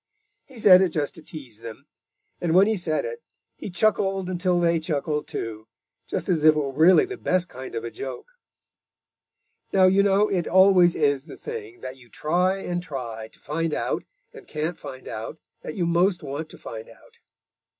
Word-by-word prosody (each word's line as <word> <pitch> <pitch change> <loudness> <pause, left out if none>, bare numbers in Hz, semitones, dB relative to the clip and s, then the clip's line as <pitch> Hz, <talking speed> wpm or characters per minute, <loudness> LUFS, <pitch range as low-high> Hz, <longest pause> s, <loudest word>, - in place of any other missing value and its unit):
He 260 -4 -13
said 185 -3 +8
it 190 - +3
just 150 -3 -2
to 165 - -12
tease 135 -8 -10
them, 115 +4 -10 0.5
and 170 -1 0
when 190 +2 +7
he 220 +1 +1
said 170 -5 -1
it, 475 -1 -6 0.3
he - - -7
chuckled 195 -1 +1
until 180 0 +1
they 170 -1 +2
chuckled 150 -2 -2
too, 110 -1 -5 0.4
just - - -3
as 170 -5 +1
if 155 0 +7
it - - +1
really 165 +6 +6
were - - -16
the 390 - -5
best 185 - 0
kind 130 -4 -9
of 115 - -3
a 115 - -5
joke. 135 - -7 1.4
Now 190 - +4
you 190 +2 +5
know 200 +1 +3
it 180 -4 -1
always 185 -2 +6
is 145 -2 +1
the - - -10
thing 430 -5 -7
that 130 +1 -7
you 120 -2 -18
try 180 - +1
and 175 0 -2
try 120 -9 -6
to - - -21
find 165 +1 -2
out - - -2 0.3
and - - -13
can't 155 +3 -3
find 130 -3 -9
out 110 +8 -6 0.2
that 155 - -7
you 175 - 0
most 175 +2 +2
want 145 +3 -5
to - - -12
find 110 0 -8
out. - - -19
170 Hz, 190 wpm, -25 LUFS, 140-190 Hz, 1.4 s, said